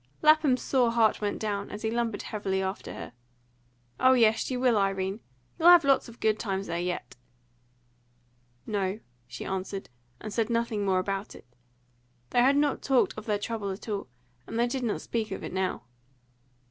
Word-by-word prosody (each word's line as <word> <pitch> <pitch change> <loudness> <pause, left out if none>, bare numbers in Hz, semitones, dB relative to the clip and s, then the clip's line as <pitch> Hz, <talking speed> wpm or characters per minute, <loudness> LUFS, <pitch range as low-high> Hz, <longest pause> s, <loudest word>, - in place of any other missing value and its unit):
Lapham's 305 -4 +5
sore 250 -3 +2
heart 225 -3 +3
went 205 -1 -1
down, 205 -2 -3
as 210 - -7
he 220 - 0
lumbered 230 -3 -1
heavily 195 -3 -2
after 190 +1 -4
her. - - -8 0.9
"Oh 260 0 +6
yes, 225 -3 +3
you 255 -1 -2
will, 250 -2 +3
Irene. 195 0 0 0.4
You'll 335 +2 +7
have 350 -2 +8
lots 275 -3 +3
of 235 - -14
good 215 -1 +1
times 195 -2 -2
there 170 - -3
yet." 180 0 -4 1.5
"No," 200 -1 -1 0.3
she 125 +1 -7
answered, 195 +1 -4 0.3
and 215 - -7
said 225 0 0
nothing 230 -3 0
more 190 -2 +2
about 195 +2 -3
it. - - -14 0.9
They 245 - +4
had 275 +3 +4
not 290 -1 +1
talked 265 -3 +2
of 215 +1 -9
their 210 -1 +1
trouble 210 -1 -4
at 190 +4 -7
all, 205 -7 -3 0.4
and - - -5
they 235 - +3
did 255 +2 -2
not 235 -4 -1
speak 225 -2 -3
of - - -6
it - - -6
now. 185 -8 -1
215 Hz, 180 wpm, -28 LUFS, 195-240 Hz, 1.5 s, have